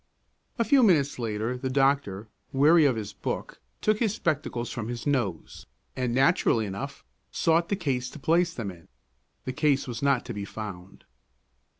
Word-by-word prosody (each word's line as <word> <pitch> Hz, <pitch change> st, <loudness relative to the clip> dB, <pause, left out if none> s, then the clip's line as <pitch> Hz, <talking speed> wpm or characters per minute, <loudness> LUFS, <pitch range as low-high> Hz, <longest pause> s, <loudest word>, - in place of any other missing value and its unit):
A 230 Hz, -, +2 dB
few 265 Hz, +5 st, +4 dB
minutes 155 Hz, -, +3 dB
later, 110 Hz, +1 st, -2 dB
the 130 Hz, +1 st, -3 dB
doctor, 135 Hz, -7 st, +1 dB, 0.2 s
weary 150 Hz, +4 st, +5 dB
of 130 Hz, -4 st, +3 dB
his 105 Hz, -2 st, -5 dB
book, -, -, -5 dB, 0.2 s
took 215 Hz, 0 st, +2 dB
his 220 Hz, -3 st, +1 dB
spectacles 135 Hz, -7 st, -2 dB
from 110 Hz, -2 st, -4 dB
his 120 Hz, -1 st, -5 dB
nose, 120 Hz, -, -2 dB, 0.3 s
and 125 Hz, -2 st, -1 dB
naturally 130 Hz, -3 st, +3 dB
enough, 135 Hz, +9 st, -6 dB, 0.3 s
sought 165 Hz, +1 st, +2 dB
the 200 Hz, -, +1 dB
case 130 Hz, -9 st, -2 dB
to -, -, -11 dB
place 170 Hz, +4 st, +2 dB
them 115 Hz, -10 st, -5 dB
in. 85 Hz, -2 st, -16 dB, 0.6 s
The 130 Hz, -, -3 dB
case 140 Hz, 0 st, +1 dB
was 120 Hz, -2 st, -5 dB
not 140 Hz, -3 st, +2 dB
to -, -, -5 dB
be 100 Hz, -1 st, -5 dB
found. 100 Hz, -3 st, -8 dB
130 Hz, 170 wpm, -27 LUFS, 115-155 Hz, 0.6 s, weary